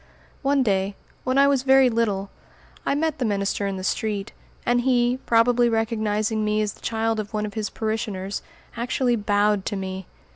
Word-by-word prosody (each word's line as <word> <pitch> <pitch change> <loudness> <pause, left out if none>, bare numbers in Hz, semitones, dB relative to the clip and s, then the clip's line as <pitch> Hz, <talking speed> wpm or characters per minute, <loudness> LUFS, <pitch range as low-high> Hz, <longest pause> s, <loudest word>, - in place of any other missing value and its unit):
One 275 -1 +2
day, 195 -2 0 0.3
when 255 +1 0
I 280 0 +6
was 280 -2 +3
very 265 0 +5
little, 210 -5 0 0.6
I - - +2
met 315 +1 -1
the - - 0
minister 200 -2 0
in 195 -1 -3
the 185 - -6
street; 205 0 -2 0.3
and 245 0 +3
he, 245 0 +2
probably 240 +1 +4
recognizing 220 -1 0
me 210 0 +1
as 210 - -2
the - - -20
child 225 0 -1
of 215 0 -5
one 210 0 0
of 205 - -6
his 215 -2 -2
parishioners, 215 -3 -3 0.3
actually 245 +1 0
bowed 205 -1 +2
to - - -2
me! 190 -1 -5
220 Hz, 180 wpm, -24 LUFS, 205-245 Hz, 0.6 s, I